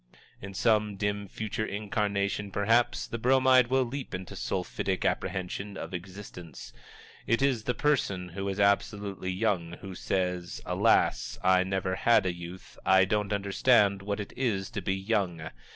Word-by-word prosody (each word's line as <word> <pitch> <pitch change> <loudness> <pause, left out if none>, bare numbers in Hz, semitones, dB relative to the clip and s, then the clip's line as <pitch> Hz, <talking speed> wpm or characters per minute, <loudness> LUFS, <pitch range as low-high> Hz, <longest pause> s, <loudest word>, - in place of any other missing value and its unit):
In 100 0 -8
some 105 -1 +2
dim 100 0 -2
future 110 +2 -4
incarnation, 100 -1 -1
perhaps, 115 +5 +2
the 115 - -5
Bromide 130 0 +5
will 130 +1 +2
leap 130 -3 -5
into 90 0 -7
sulphitic - - -2
apprehension 95 +2 -2
of - - -7
existence. 90 -2 -9 0.5
It 115 +4 +2
is 125 -6 +1
the 125 - 0
person 100 -11 0
who 95 +3 -4
is 95 +1 -3
Absolutely 100 -1 +1
Young 90 -3 0
who 95 +2 -8
says, 90 -1 -2
"Alas, - - +2
I 95 0 +5
never 95 0 -1
had 115 -4 +4
a 90 - 0
youth 85 +1 -10
I 95 -1 +5
don't 105 0 -1
understand 100 0 +3
what 100 +1 -3
it 100 - -6
is 105 -7 -1
to 105 - -4
be 95 +1 0
young!" 95 -5 -1
100 Hz, 150 wpm, -29 LUFS, 95-110 Hz, 0.5 s, Bromide